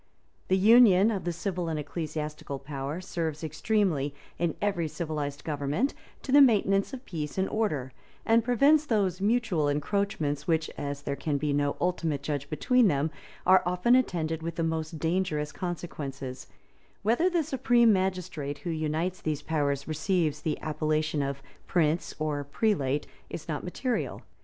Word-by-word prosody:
The 190 - +3
union 215 -1 +7
of 195 -4 -3
the 175 - 0
civil 175 -1 -3
and 160 - -2
ecclesiastical 150 -1 -4
power 140 +4 -5
serves 165 -4 -3
extremely, 155 -3 0 0.2
in 170 -2 0
every 190 -5 0
civilized 150 -3 -4
government, 150 - -1 0.3
to 265 - -4
the 285 +1 +8
maintenance 200 -6 +4
of 265 -1 -8
peace 150 -3 -5
and 190 0 +1
order; 150 - -1 0.3
and 230 0 +4
prevents 280 +6 +4
those 200 - 0
mutual 205 -8 +2
encroachments 155 0 -1
which, 160 -1 +1
as 140 0 -4
there 140 - -2
can 145 0 -1
be 145 0 -1
no 145 0 +1
ultimate 165 -5 -1
judge 145 -1 -3
between 250 - +3
them, 150 -2 +1 0.3
are 185 0 +7
often 180 +7 +2
attended 165 -10 0
with 165 0 -4
the 165 - -1
most 160 0 -2
dangerous 160 -2 -1
consequences 140 -7 -5 0.6
Whether 240 - +3
the 345 -3 +1
supreme 245 -5 +4
magistrate 180 -6 -2
who 170 - -1
unites 160 +3 -2
these 150 -2 -2
powers 140 -3 -1
receives 155 -1 0
the 155 - -2
appellation 155 0 0
of 140 0 -3 0.2
prince 165 -1 +1
or 150 -2 -1
prelate, 145 -3 0 0.2
is 160 - -7
not 155 -3 -3
material. 245 +7 -2
160 Hz, 150 wpm, -28 LUFS, 150-195 Hz, 0.6 s, the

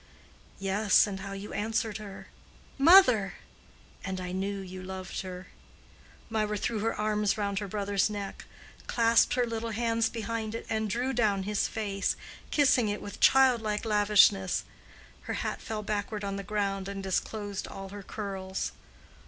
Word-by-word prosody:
"Yes, 195 +3 +4
and 195 -2 -5
how 195 0 -6
you 195 +1 -7
answered 220 0 -1
her—'Mother!'—and 215 - +1
I 180 -1 -5
knew 195 +2 -2
you 185 -1 -7
loved 185 0 -5
her." 185 -1 -7 0.8
Mirah 215 -1 -1
threw 225 +2 -1
her 225 +2 0
arms 210 0 +1
round 200 -1 -1
her 205 - -4
brother's 200 0 0
neck, 205 -2 -6 0.4
clasped 230 0 +4
her 250 -1 +2
little 230 0 -3
hands 230 0 +1
behind 225 -1 -4
it, 230 - -5
and 220 -1 0
drew 245 +5 -1
down 210 -5 +2
his 210 +1 0
face, 200 -3 -1 0.3
kissing 260 -6 +3
it 205 - -2
with 205 - -8
childlike 235 -5 +4
lavishness. 205 -3 +4 0.7
Her - - -1
hat - - -3
fell 215 -1 -4
backward 210 0 -3
on 200 0 -2
the 200 - -3
ground 195 -1 -2
and 200 -1 -5
disclosed 200 +1 -2
all 195 0 -8
her 205 +1 -8
curls. 190 -2 -4
210 Hz, 145 wpm, -29 LUFS, 195-225 Hz, 0.8 s, Yes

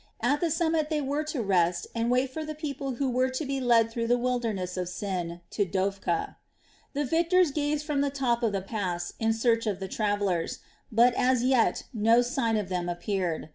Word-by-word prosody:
At 275 +6 +1
the 340 - +2
summit 320 -1 +1
they 310 -2 0
were 290 +2 -1
to 300 -6 -2
rest 175 -3 +2
and 230 0 0
wait 255 +1 +2
for 315 +3 -4
the 310 0 -5
people 280 -4 -4
who 275 +3 -1
were 255 +1 +1
to 260 +4 -3
be 275 0 -2
led 230 -2 +4
through 230 0 -2
the 245 +1 +3
wilderness 230 -7 -1
of 180 -1 -3
Sin 180 -3 -4
to 205 - +1
Dophkah. 190 -2 -1 0.6
The 290 0 -1
victors 335 +3 +3
gazed 295 +1 -1
from 295 -2 0
the 285 - +1
top 260 -4 0
of 230 -3 +1
the 195 -2 -2
pass 180 -4 -3
in 225 0 +2
search 230 0 +1
of 200 -3 -1
the 190 - -4
travellers; 205 -5 -1 0.3
but 235 +2 +5
as 250 0 +2
yet 255 -2 +2
no 225 +2 +4
sign 235 -2 0
of 210 -3 -2
them 180 -1 -2
appeared. 175 -3 -2
235 Hz, 205 wpm, -28 LUFS, 195-275 Hz, 0.6 s, but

